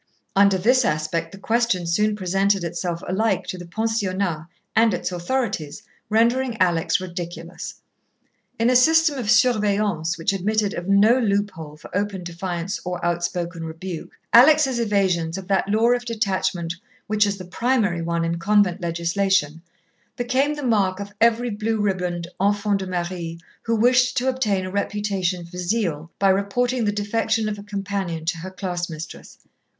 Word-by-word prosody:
Under 200 -1 +5
this 250 +7 +3
aspect 165 0 -1
the 195 - -10
question 225 -4 0
soon 210 +5 +1
presented 195 0 +1
itself 170 0 -3
alike 220 +5 0
to 185 - -5
the 175 - -9
pensionnat 190 -5 -1 0.3
and 225 -3 +4
its 180 - -3
authorities, 175 - -2 0.3
rendering 235 +2 +2
Alex 175 0 +2
ridiculous. 175 -1 -7 0.8
In 230 +2 +3
a - - +2
system 315 +2 +4
of 220 -4 -3
surveillance 205 - +2
which 165 +3 0
admitted 205 +1 0
of 175 - -5
no 210 +5 +5
loophole 200 -9 -2
for 150 - -11
open 200 -2 -2
defiance 175 +2 -4
or 180 -1 -4
outspoken 175 0 -2
rebuke, 165 +1 -7 0.2
Alex' 265 +1 +6
evasions 190 -7 +1
of 190 -1 -8
that 195 0 +1
law 225 +3 +3
of 245 0 +1
detachment 190 -7 -1 0.3
which 210 0 +2
is 200 0 -2
the 185 - -8
primary 205 -3 0
one 170 0 -1
in 170 0 -2
convent 200 -1 +2
legislation, 170 -1 0 0.5
became 265 +4 0
the 295 - -6
mark 200 -5 +1
of 200 0 -7
every 235 +1 +3
blue 215 +1 -1
ribboned 180 -4 -1
enfant 205 0 +2
de 190 - -5
Marie 175 -2 -4 0.3
who 230 - +1
wished 250 +3 +3
to 255 - +1
obtain 215 -8 0
a 185 - -5
reputation 195 -3 -1
for 175 +2 -11
zeal 175 -5 -1
by 195 - +3
reporting 230 +5 +1
the 205 - +2
defection 220 +1 0
of 210 -1 -3
a - - -9
companion 195 -5 -4
to 165 0 -1
her 185 +3 -6
class 180 -2 -4
mistress. 155 0 -9
195 Hz, 155 wpm, -23 LUFS, 175-220 Hz, 0.8 s, Alex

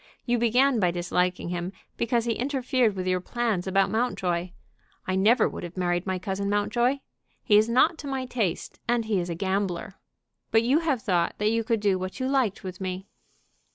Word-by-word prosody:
You 240 -1 +1
began 245 +2 +3
by 180 -3 +3
disliking 180 0 -1
him, 175 +1 -3 0.2
because 235 0 0
he 235 - +1
interfered 255 -3 0
with 185 -1 -3
your 185 0 +1
plans 220 -4 -1
about 195 +1 +2
Mountjoy. 185 -7 -1 0.6
I 185 - -1
never 210 +6 +4
would - - -6
have 175 +1 -8
married 175 0 0
my 190 0 0
cousin 195 +2 -3
Mountjoy. 240 +6 +1 0.4
He 210 - +4
is 215 +2 +5
not 310 +8 +3
to 290 - -7
my 265 -1 -2
taste, 225 -9 -2
and 235 -1 +1
he 215 -3 +1
is 175 0 -3
a 170 - -2
gambler. 190 0 -2 0.5
But 225 0 +4
you 265 +6 +3
have 290 -9 -1
thought 175 -3 +1
that 210 +1 +1
you 230 0 +1
could 225 -1 0
do 195 -3 +2
what 185 +6 -5
you 260 - -1
liked 260 -7 0
with 185 0 -7
me." 185 +1 -4
205 Hz, 195 wpm, -26 LUFS, 185-240 Hz, 0.6 s, is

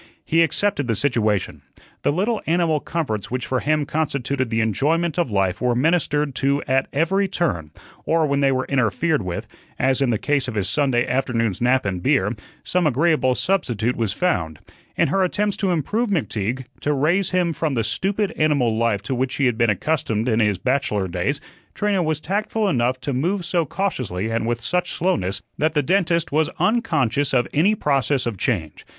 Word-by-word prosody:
He 165 +1 +3
accepted 165 -3 +1
the 115 - +1
situation. 110 -5 0 0.4
The - - +2
little 205 +8 0
animal 165 -2 +2
comforts 140 - -3
which 130 0 -3
for 130 - 0
him 150 +1 +1
constituted 140 -4 -1
the 115 0 0
enjoyment 150 - +1
of 170 - +1
life 95 -3 0
were 125 -1 +2
ministered 150 0 +1
to 140 +1 +1
at 135 +1 +2
every 190 +7 +1
turn, 150 - -2 0.3
or 160 -1 +2
when 140 -1 0
they 140 -1 +3
were 130 -1 0
interfered 140 - +1
with 90 -2 -4 0.3
as 130 +1 +1
in 135 - +2
the 115 - +1
case 140 +1 0
of 125 - -5
his 100 -3 0
Sunday 125 +1 +1
afternoon's 115 -6 0
nap 125 +1 +2
and 95 -3 -2
beer - - +1 0.3
some 180 -3 +1
agreeable 145 -2 +2
substitute 125 - 0
was 115 -4 0
found. 80 - -1 0.4
In - - +3
her 195 +5 +2
attempts 205 +2 0
to 195 - 0
improve 205 - 0
McTeague 130 - -2
to 150 - 0
raise 160 +8 +1
him 180 -2 +1
from 155 -3 -1
the 115 - +1
stupid 200 - -1
animal 140 -7 +2
life 110 -3 0
to 125 - -3
which 130 +1 -1
he 140 - +1
had 120 -3 +2
been 115 0 +2
accustomed 115 -1 0
in 115 -2 +2
his 105 -4 +2
bachelor 105 -3 0
days 90 +10 -1 0.4
Trina 205 -2 +1
was 155 -3 0
tactful 210 +5 -1
enough 130 -6 +1
to 140 +2 -2
move 175 +8 -1
so 170 -2 0
cautiously 125 - -2
and 115 0 -1
with 120 0 -1
such 180 +9 -1
slowness 100 - -1 0.2
that 155 +1 +1
the 150 - +2
dentist 170 0 +1
was 155 +1 +2
unconscious 145 - +1
of 120 -1 +2
any 185 +9 +3
process 140 - +1
of 115 -6 -3
change. 85 - -2
140 Hz, 185 wpm, -22 LUFS, 115-165 Hz, 0.4 s, He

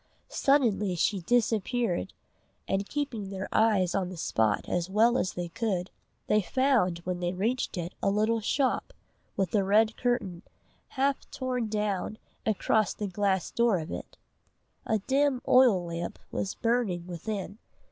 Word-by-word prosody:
Suddenly 225 -9 +2
she 195 +4 +1
disappeared, 225 - 0 0.5
and 195 +1 -1
keeping 260 -9 -3
their 190 -1 -5
eyes 205 -5 +3
on 190 -2 0
the 185 - -8
spot 110 -8 0
as 175 0 -1
well 225 +5 +4
as 190 - 0
they 175 -1 -4
could, 185 -1 -2 0.3
they 215 - +3
found 235 -5 +2
when 180 0 -3
they 175 0 -1
reached 220 +3 -1
it 175 +1 -4
a - - +2
little 215 +3 +1
shop, 265 +5 0 0.4
with 190 -3 0
a 205 -2 +3
red 215 +3 +3
curtain, 205 -9 -1 0.6
half 275 +1 0
torn 250 -3 -2
down, 210 -1 -2 0.3
across 215 0 +1
the 210 - -3
glass 195 -1 0
door 235 -4 +3
of 160 -1 -5
it. - - -7 0.7
A 220 - +2
dim 270 +5 +1
oil 245 -9 +5
lamp 170 0 -4
was 195 - -3
burning 225 -7 0
within. 195 +3 -5
205 Hz, 145 wpm, -28 LUFS, 180-235 Hz, 0.7 s, oil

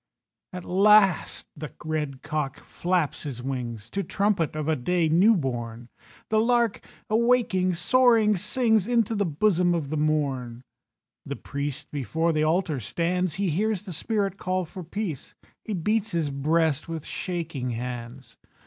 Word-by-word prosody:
At 180 -1 -7
last 195 0 +4
the 150 -1 -7
red 150 -4 -3
cock 150 -3 -3
flaps 175 -4 -1
his 130 -5 -6
wings 120 -5 -4
To 200 - -1
trumpet 195 -6 0
of 155 -1 -3
a 160 - +2
day 170 +5 +1
new 185 +8 +5
born. 120 -4 -4 0.4
The 215 - +3
lark, 235 -1 +2 0.2
awaking, 220 -5 +2
soaring 225 +2 +4
sings 220 +1 +2
Into 230 -2 +2
the 205 -3 0
bosom 175 +2 +2
of 150 -4 -3
the 155 - -1
morn. 135 -6 -1 0.6
The - - -5
priest 140 +1 -5
before 160 +4 0
the 155 - +1
altar 160 -2 +1
stands, 175 - -1
He 195 -3 0
hears 205 +3 0
the 185 - -6
spirit 200 +2 -1
call 185 -1 -1
for 180 +3 -9
peace; 170 -4 -5 0.3
He 215 - -3
beats 210 +4 0
his 160 -4 0
breast 155 +2 +1
with 165 -2 -5
shaking 165 -8 -4
hands. 120 +1 -6
170 Hz, 150 wpm, -26 LUFS, 145-200 Hz, 0.6 s, new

